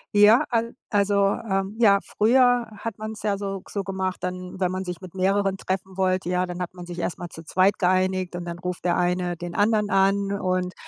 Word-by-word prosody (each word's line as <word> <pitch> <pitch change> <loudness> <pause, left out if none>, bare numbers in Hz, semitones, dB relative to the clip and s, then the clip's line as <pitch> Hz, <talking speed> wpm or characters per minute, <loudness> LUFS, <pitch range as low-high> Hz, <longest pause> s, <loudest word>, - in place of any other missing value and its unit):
Ja, 210 +3 +7
al 230 -1 -1 0.2
also, 200 -1 +3 0.2
ähm 195 +1 -1
ja, 200 -4 +6
früher 245 +2 +3
hat 230 -2 -5
man's 215 0 -6
ja 205 -2 0
so 195 -1 -4
so 200 - -3
gemacht 190 -1 -2
dann, 180 0 -5
wenn 185 -1 +1
man 185 0 -3
sich 180 -1 -6
mit 185 -3 -10
mehreren 195 +1 +1
treffen 190 0 -4
wollte, 185 -1 +1
ja, 180 0 +1
dann 175 0 -5
hat 175 - -7
man 180 -1 -10
sich 175 -1 -7
erst 175 -1 -3
mal 175 - -6
zu 165 - -11
zweit 185 +4 +2
geeinigt 185 -1 +1
und 175 - -4
dann 170 0 -5
ruft 180 0 -5
der 175 - +2
eine 180 0 0
den 175 +1 -6
anderen 210 0 +2
an 195 +1 +2
und, 185 -2 -1
190 Hz, 215 wpm, -24 LUFS, 180-200 Hz, 0.2 s, Ja